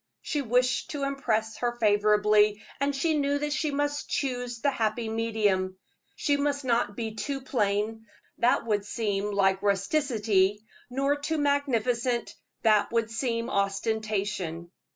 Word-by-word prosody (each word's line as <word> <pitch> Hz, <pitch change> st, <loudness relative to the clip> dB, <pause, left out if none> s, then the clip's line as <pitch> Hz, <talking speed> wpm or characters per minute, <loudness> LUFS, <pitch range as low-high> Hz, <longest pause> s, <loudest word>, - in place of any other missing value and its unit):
She 295 Hz, -, -1 dB
wished 250 Hz, 0 st, +1 dB
to 290 Hz, -2 st, -4 dB
impress 225 Hz, -6 st, -1 dB
her 240 Hz, -1 st, -1 dB
favorably, 210 Hz, 0 st, +3 dB, 0.2 s
and 280 Hz, +1 st, 0 dB
she 320 Hz, +4 st, +1 dB
knew 285 Hz, -1 st, +1 dB
that 295 Hz, 0 st, -2 dB
she 310 Hz, 0 st, 0 dB
must 290 Hz, 0 st, -2 dB
choose 245 Hz, -3 st, -2 dB
the 280 Hz, +4 st, +2 dB
happy 225 Hz, -1 st, -1 dB
medium. 210 Hz, -5 st, 0 dB, 0.4 s
She 285 Hz, -1 st, +1 dB
must 285 Hz, -1 st, -1 dB
not 230 Hz, -4 st, +1 dB
be 225 Hz, -1 st, -4 dB
too 270 Hz, +5 st, -3 dB
plain 220 Hz, -3 st, -1 dB, 0.3 s
that 240 Hz, 0 st, +3 dB
would 210 Hz, -3 st, 0 dB
seem 205 Hz, -1 st, -2 dB
like 195 Hz, -1 st, +2 dB
rusticity: 205 Hz, -2 st, +1 dB, 0.2 s
nor 275 Hz, +3 st, +1 dB
too 305 Hz, +2 st, -2 dB
magnificent 250 Hz, -4 st, 0 dB, 0.3 s
that 215 Hz, -2 st, +4 dB
would 230 Hz, -1 st, +1 dB
be 230 Hz, 0 st, -1 dB
ostentation. 200 Hz, -4 st, -2 dB
230 Hz, 135 wpm, -27 LUFS, 210-275 Hz, 0.4 s, that